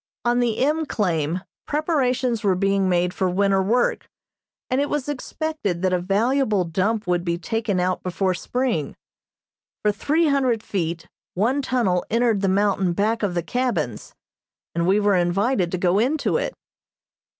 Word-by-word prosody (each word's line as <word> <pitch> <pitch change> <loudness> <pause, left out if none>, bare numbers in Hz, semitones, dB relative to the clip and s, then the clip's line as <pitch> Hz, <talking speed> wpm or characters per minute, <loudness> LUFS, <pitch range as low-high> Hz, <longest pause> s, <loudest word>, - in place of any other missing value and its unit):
On 240 +1 +2
the 235 -3 +1
M. 310 +1 0
claim 175 - -1 0.2
preparations 255 -6 0
were 195 -3 +3
being 195 0 +1
made 180 0 +1
for 185 - 0
winter 195 +1 +2
work, 230 +6 0 0.6
and 260 +2 +1
it 285 - -1
was 295 -2 -2
expected 290 - -3
that 185 -1 +2
a 180 - +2
valuable 210 +3 +1
dump 195 +6 -1
would 175 -1 0
be 170 -1 -1
taken 210 +2 -1
out 180 +1 0
before 185 +1 0
spring. 225 - -2 0.9
For 210 - +3
three 305 +10 +1
hundred 255 -6 +1
feet 170 -3 -3 0.3
one 240 +9 +1
tunnel 235 -10 +1
entered 230 -3 +2
the 195 - +2
mountain 195 -2 +2
back 215 +5 0
of 195 -4 -1
the 175 - 0
cabins, 245 +8 -2 0.6
and 170 0 0
we 195 +3 +4
were 205 -1 +3
invited 180 +2 +1
to 185 - -1
go 180 +2 +2
into 280 +7 +1
it. - - -3
205 Hz, 160 wpm, -23 LUFS, 180-250 Hz, 0.9 s, we